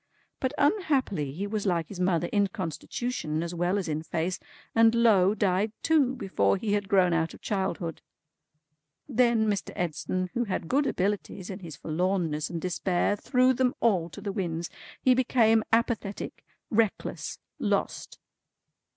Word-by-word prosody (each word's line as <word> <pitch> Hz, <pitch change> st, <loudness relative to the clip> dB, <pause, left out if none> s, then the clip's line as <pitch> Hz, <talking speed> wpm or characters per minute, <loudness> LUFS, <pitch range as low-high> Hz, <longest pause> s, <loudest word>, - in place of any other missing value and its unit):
But 260 Hz, -, -1 dB
unhappily 280 Hz, -, +1 dB
he 180 Hz, +8 st, -4 dB
was 205 Hz, 0 st, -2 dB
like 170 Hz, -4 st, +1 dB
his 195 Hz, -, -8 dB
mother 180 Hz, -2 st, +2 dB
in 205 Hz, -1 st, +3 dB
constitution 165 Hz, -1 st, -3 dB
as 170 Hz, 0 st, -4 dB
well 175 Hz, +3 st, 0 dB
as 195 Hz, -, -2 dB
in 155 Hz, 0 st, -1 dB
face, 165 Hz, +3 st, -2 dB, 0.3 s
and 225 Hz, 0 st, +5 dB
lo, 210 Hz, -4 st, +5 dB
died 200 Hz, +1 st, +1 dB
too 285 Hz, -5 st, +3 dB
before 195 Hz, -3 st, +1 dB
he 205 Hz, +1 st, -1 dB
had 205 Hz, -1 st, -1 dB
grown 185 Hz, -3 st, +4 dB
out 160 Hz, 0 st, 0 dB
of -, -, -16 dB
childhood. 190 Hz, -5 st, -2 dB, 1.1 s
Then 235 Hz, -4 st, +3 dB
Mr. 205 Hz, -2 st, -1 dB
Edson, 180 Hz, +2 st, -2 dB
who 240 Hz, 0 st, 0 dB
had 185 Hz, -5 st, -3 dB
good 280 Hz, -, +2 dB
abilities, 190 Hz, -1 st, -2 dB
in 190 Hz, -, -6 dB
his 165 Hz, -6 st, -8 dB
forlornness 165 Hz, 0 st, -1 dB
and 170 Hz, -, -3 dB
despair, 180 Hz, +2 st, 0 dB
threw 255 Hz, +4 st, +3 dB
them 255 Hz, +2 st, +1 dB
all 185 Hz, -8 st, +2 dB
to 155 Hz, -, -10 dB
the 205 Hz, -, -3 dB
winds. 170 Hz, -4 st, -3 dB, 0.3 s
He 255 Hz, -, +4 dB
became 230 Hz, -3 st, +3 dB
apathetic, 225 Hz, -3 st, -1 dB, 0.3 s
reckless, 220 Hz, -2 st, 0 dB, 0.2 s
lost. -, -, -1 dB
195 Hz, 150 wpm, -28 LUFS, 175-230 Hz, 1.1 s, and